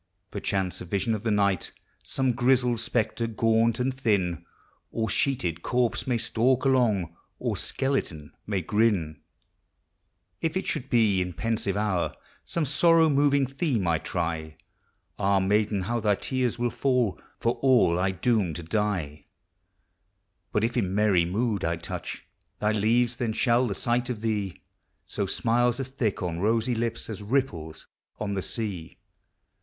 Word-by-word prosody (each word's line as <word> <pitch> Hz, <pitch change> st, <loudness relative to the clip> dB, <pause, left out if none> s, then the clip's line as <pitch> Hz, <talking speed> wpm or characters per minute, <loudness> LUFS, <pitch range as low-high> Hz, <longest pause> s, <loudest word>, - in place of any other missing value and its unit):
Perchance 95 Hz, -2 st, -2 dB
a -, -, -6 dB
vision 100 Hz, +5 st, 0 dB
of 105 Hz, -, -2 dB
the 115 Hz, -, -1 dB
night, 100 Hz, -4 st, +1 dB, 0.3 s
Some 130 Hz, -1 st, 0 dB
grizzled 125 Hz, -1 st, +2 dB
spectre, 115 Hz, 0 st, -1 dB
gaunt 115 Hz, +1 st, +2 dB
and 130 Hz, +1 st, 0 dB
thin, 95 Hz, -, 0 dB, 0.5 s
Or 110 Hz, -1 st, -1 dB
sheeted 100 Hz, -, 0 dB
corpse, 125 Hz, +2 st, 0 dB
may 125 Hz, -2 st, +2 dB
stalk 120 Hz, +3 st, +1 dB
along, 110 Hz, -11 st, +2 dB, 0.2 s
Or -, -, -2 dB
skeleton 85 Hz, -, -2 dB, 0.2 s
may 100 Hz, -3 st, 0 dB
grin. 95 Hz, -8 st, +1 dB, 1.2 s
If 165 Hz, +2 st, 0 dB
it 190 Hz, -, -3 dB
should 130 Hz, -, -2 dB
be 110 Hz, -6 st, +3 dB
in 90 Hz, 0 st, -3 dB
pensive 110 Hz, -1 st, -1 dB
hour 105 Hz, -5 st, 0 dB, 0.3 s
Some 165 Hz, -2 st, -1 dB
sorrow 165 Hz, +3 st, +4 dB
moving 140 Hz, -1 st, +3 dB
theme 135 Hz, -, -1 dB
I 80 Hz, -2 st, +2 dB
try, 80 Hz, -3 st, -3 dB, 0.6 s
Ah, 100 Hz, 0 st, +3 dB
maiden, 105 Hz, +1 st, +1 dB
how 120 Hz, +5 st, -1 dB
thy 105 Hz, -2 st, +2 dB
tears 125 Hz, +1 st, -1 dB
will 120 Hz, 0 st, 0 dB
fall, 125 Hz, -7 st, 0 dB, 0.2 s
For 115 Hz, -, -1 dB
all 120 Hz, -10 st, +4 dB
I 95 Hz, +1 st, +2 dB
doom 95 Hz, -2 st, 0 dB
to 85 Hz, -, -6 dB
die! 85 Hz, -6 st, -2 dB, 1.3 s
But 105 Hz, -, +1 dB
if 115 Hz, +1 st, 0 dB
in 95 Hz, -6 st, 0 dB
merry 100 Hz, -5 st, +3 dB
mood 105 Hz, +3 st, -1 dB
I 85 Hz, +1 st, +1 dB
touch 85 Hz, -, -6 dB, 0.3 s
Thy 105 Hz, 0 st, +1 dB
leaves, 115 Hz, +3 st, +2 dB
then 115 Hz, -3 st, -1 dB
shall 120 Hz, +2 st, +2 dB
the 100 Hz, -, -3 dB
sight 120 Hz, +2 st, 0 dB
of 115 Hz, -4 st, -4 dB
thee 105 Hz, -5 st, -2 dB, 0.4 s
Sow 100 Hz, -2 st, -3 dB
smiles 120 Hz, +4 st, +1 dB
as 135 Hz, -1 st, -4 dB
thick 115 Hz, -8 st, -2 dB
on 85 Hz, -2 st, -2 dB
rosy 115 Hz, +5 st, +1 dB
lips 115 Hz, 0 st, -2 dB
As 105 Hz, -2 st, -6 dB
ripples 100 Hz, -, -2 dB, 0.3 s
on 100 Hz, -1 st, -2 dB
the 95 Hz, -, -1 dB
sea. 95 Hz, -7 st, -4 dB
110 Hz, 150 wpm, -26 LUFS, 95-120 Hz, 1.3 s, sorrow